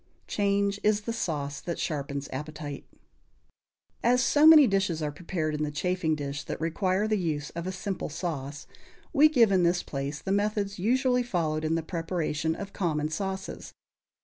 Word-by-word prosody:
_ - - -39 0.2
"Change 200 0 0
is 210 0 +2
the 230 +2 -3
sauce 145 -9 -3
that 170 - -4
sharpens 140 -2 -3
appetite." 150 0 -6 1.2
As 250 +2 +4
so 295 +3 +5
many 310 -3 +10
dishes 190 -7 0
are 150 - -1
prepared 155 0 -3
in 150 - -3
the 150 - 0
chafing 165 +1 0
dish 145 -1 -4
that - - -5
require 185 +5 0
the 215 -1 +1
use 150 -4 -2
of 170 +1 -5
a - - -1
simple 190 -1 -4
sauce, 145 -3 -5 0.5
we 305 +1 +7
give 235 -8 +4
in 190 -2 +4
this 175 0 +2
place 140 +1 -4
the 190 - -4
methods 205 -1 0
usually 250 +5 +2
followed 165 -9 -1
in 160 +1 +1
the 165 - -1
preparation 165 -2 -2
of 200 +2 -7
common 155 -5 -1
sauces. 190 +3 -5
175 Hz, 175 wpm, -28 LUFS, 150-200 Hz, 1.2 s, many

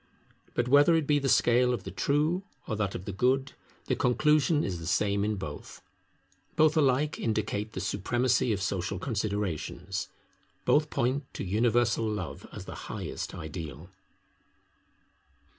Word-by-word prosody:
But 120 - +1
whether 145 +5 +6
it 160 -2 +1
be 145 0 +3
the 135 -1 0
scale 125 +1 +4
of 100 - -8
the - - -6
True 150 - +1 0.3
or 110 - -1
that 105 -2 -2
of 90 - -6
the 100 - -4
Good, 130 +7 +1 0.3
the - - 0
conclusion 150 +4 +3
is 90 -3 -3
the 80 - -7
same 100 +2 +1
in 105 +1 0
both. 75 -7 -8 0.7
Both 155 0 +4
alike 145 0 +2
indicate 110 -1 -1
the - - -4
supremacy 120 +6 +1
of 100 -3 -1
social 95 -1 -2
considerations; 100 - -3 0.6
both 150 +1 +3
point 130 +3 -1
to - - -4
universal 115 +2 +2
Love 95 -6 -5
as - - -8
the - - -7 0.2
highest - - -5
ideal. 80 0 -7
110 Hz, 145 wpm, -29 LUFS, 100-135 Hz, 0.7 s, whether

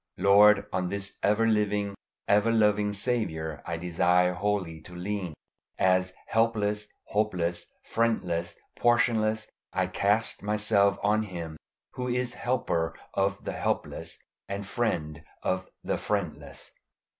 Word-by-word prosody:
Lord, 100 +1 +6
on 90 -1 0
this 100 0 -4
ever 105 +2 +3
living, 105 -2 +1 0.3
ever 105 +3 +4
loving 105 -2 +3
Saviour 100 - -2
I 85 -1 -2
desire 90 +1 +2
wholly 90 -4 -2
to 90 - -11
lean. 90 -2 -3 0.4
As 95 0 +2
helpless, 105 -2 +1 0.2
hopeless, 90 -5 0 0.2
friendless, 90 -7 0 0.2
portionless, 110 -2 +2 0.2
I - - +1
cast 105 +3 +1
myself 105 -1 +2
on 105 +1 +3
Him 85 -6 -6 0.4
who 125 0 -4
is 125 0 0
Helper 115 -11 -1 0.2
of 100 +1 0
the - - -3
helpless - - -3 0.3
and 100 0 -3
Friend 85 - -2 0.2
of 95 0 -1
the - - -1
friendless. 75 -9 -3
100 Hz, 120 wpm, -28 LUFS, 90-110 Hz, 0.4 s, Lord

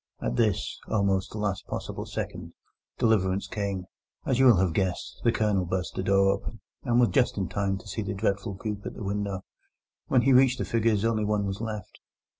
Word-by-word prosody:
At - - -2
this, 110 -5 0
almost 100 -3 +1
the - - -6
last 100 -2 -2
possible - - -5
second, - - -5 0.4
deliverance 100 -4 +2
came, 100 -2 -3 0.4
as 130 -1 +1
you 130 - +7
will 120 - +8
have 90 -2 +2
guessed: 95 -1 -2
the 115 - +4
Colonel 105 -4 +1
burst 90 -1 -2
the - - -2
door 95 +1 +4
open, 105 +3 -4 0.2
and 120 -2 +2
was 120 -3 +5
just 120 +6 +2
in 95 -2 -1
time 100 -1 -1
to 95 - -13
see 100 +3 -3
the 100 -1 -3
dreadful 100 0 -1
group 105 0 -5
at - - -6
the - - -7
window. 100 -1 -2 0.6
When 125 -2 +3
he 135 - +5
reached 130 0 +5
the - - -2
figures 115 -2 +1
only 110 -2 +1
one 105 -1 +1
was 100 +1 -3
left. 110 -4 -6
100 Hz, 205 wpm, -27 LUFS, 95-115 Hz, 0.6 s, will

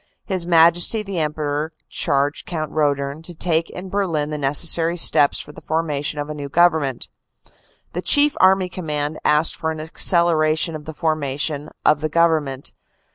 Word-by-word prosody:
His 185 -4 -2
Majesty 170 +5 +4
the 195 -4 -5
Emperor 150 0 -3
charged 145 -1 -2
Count 155 -3 -4
Roedern 145 -1 -1
to 170 +1 -8
take 165 0 0
in 180 +1 -9
Berlin 165 -7 -2
the 150 - -3
necessary 165 +4 +2
steps 145 -3 +4
for - - -9
the - - -14
formation 150 -2 -3
of 145 0 -4
a 150 - -6
new 145 -2 -7
Government. 160 -5 +1 0.9
The - - -3
Chief 295 0 +5
Army 190 0 +4
Command 155 -4 -4
asked 150 +2 +2
for 160 -1 -3
an 160 -1 -5
acceleration 160 0 +2
of 150 -1 -9
the 160 - -8
formation 150 -1 -3 0.2
of 150 - +3
the 155 - -2
Government. 155 -5 0
155 Hz, 160 wpm, -20 LUFS, 150-170 Hz, 0.9 s, Chief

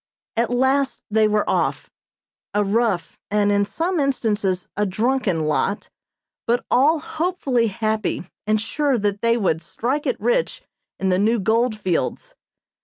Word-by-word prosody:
At 230 +1 +1
last 265 +2 +1
they 215 0 +4
were 210 0 +1
off. - - -1 0.6
A 210 - +3
rough, 200 -5 0
and 205 0 +2
in 205 0 +2
some 335 - -1
instances 210 -9 0
a 210 - 0
drunken 210 -3 0
lot, 155 +6 -1 0.6
but 240 +1 +1
all 290 +6 +4
hopefully 300 -9 0
happy 215 -3 -2 0.2
and 215 0 +3
sure 275 +4 0
that 205 -1 -1
they 230 0 +3
would 175 -7 0
"strike 245 - -2
it - - -1
rich" 485 0 0 0.4
in 190 - 0
the 185 0 +2
new 225 +3 +2
gold 225 +3 +1
fields. 205 - -2
220 Hz, 145 wpm, -22 LUFS, 200-260 Hz, 0.6 s, they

